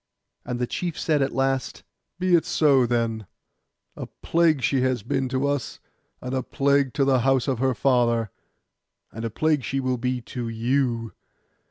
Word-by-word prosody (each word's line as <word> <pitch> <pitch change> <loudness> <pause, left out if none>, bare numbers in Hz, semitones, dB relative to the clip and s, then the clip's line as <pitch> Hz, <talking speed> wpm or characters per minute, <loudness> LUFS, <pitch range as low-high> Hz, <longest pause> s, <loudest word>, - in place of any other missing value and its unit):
And 125 0 -4
the 125 - 0
chief 170 +6 -4
said 150 -3 +1
at 135 - 0
last, 135 -1 -1 0.3
'Be 185 0 0
it 170 - +5
so, 135 -5 +3
then; 115 -3 -1 0.7
a - - -7
plague 165 -5 +1
she 135 +1 +2
has 130 -4 0
been 130 +3 -1
to 130 +2 0
us, 140 -5 -3 0.4
and 125 +1 -5
a 130 - 0
plague 140 0 +1
to 140 -2 +2
the 135 -2 +3
house 130 0 +2
of 130 -4 -1
her 130 -1 +1
father, 120 -3 +1 0.8
and 115 - -7
a 115 - -2
plague 150 +4 0
she 135 +3 -2
will 130 -2 -1
be 125 +1 -1
to 120 0 -6
you. 115 0 -1
130 Hz, 175 wpm, -24 LUFS, 120-140 Hz, 0.8 s, it